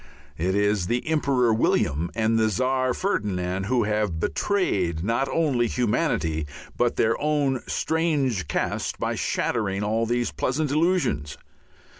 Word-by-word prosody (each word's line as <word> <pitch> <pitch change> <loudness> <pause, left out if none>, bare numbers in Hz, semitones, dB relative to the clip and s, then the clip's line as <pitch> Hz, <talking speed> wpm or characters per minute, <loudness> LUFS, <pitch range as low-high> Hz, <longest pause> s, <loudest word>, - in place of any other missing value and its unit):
It 95 +3 0
is 105 -3 +1
the 120 +6 -1
Emperor 135 -7 +2
William 85 -6 +1
and 115 0 +2
the 110 0 +3
Czar 130 +4 +1
Ferdinand 95 - -1
who 120 +2 +1
have 105 -5 -1
betrayed 90 - 0
not 115 +6 0
only 135 -8 +1
humanity 80 -10 0 0.3
but 120 -1 +1
their 110 +1 +2
own 145 -4 +1
strange 145 - 0
caste - - -2
by - - -1
shattering 105 -4 -1
all 110 +2 0
these 120 +1 0
pleasant 145 +2 -1
illusions. 155 - 0
115 Hz, 130 wpm, -25 LUFS, 95-135 Hz, 0.3 s, the